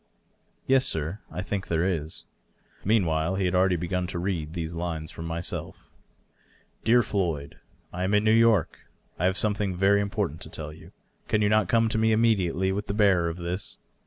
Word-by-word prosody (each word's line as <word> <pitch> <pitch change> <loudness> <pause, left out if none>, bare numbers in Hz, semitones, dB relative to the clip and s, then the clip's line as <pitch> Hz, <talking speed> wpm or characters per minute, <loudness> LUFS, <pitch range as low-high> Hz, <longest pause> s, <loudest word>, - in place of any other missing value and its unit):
" - - -43 0.2
Yes, 130 -1 +4
sir; 80 +6 -2
I 90 - -4
think 100 -1 -3
there 85 +1 +1
is." 80 -4 -3 0.6
Meanwhile 90 -5 +1
he 95 -1 0
had 90 - 0
already 90 0 +3
b^un 90 +1 -2
to 85 - -4
read 85 -4 -2
these 85 -2 -4
lines 85 -2 -4
from 80 - -7
myself: 85 +1 -5 0.5
" - - -35
Dear 120 +2 +5
Floyd, 85 -10 -2 0.2
— - - -35
^I 90 +1 -3
am 100 +3 +2
in 105 - +3
New 110 - +4
York. 115 -6 +3 0.3
I 90 - +1
have 95 +1 +2
something 105 -3 0
very 100 +2 +3
im 100 - -2
portant 95 -7 -2
to - - -8
tell 75 -1 -7
you. 80 - -14 0.4
Can 105 -1 +2
you 105 - +3
not 105 -3 +3
come 115 -1 +3
to 110 0 -1
me 110 0 +3
immediately 95 -5 +2
with 100 +2 -3
the 100 - -2
bearer 95 -5 +3
of 85 - -6
this? 90 +3 -5
95 Hz, 205 wpm, -26 LUFS, 85-105 Hz, 0.6 s, Dear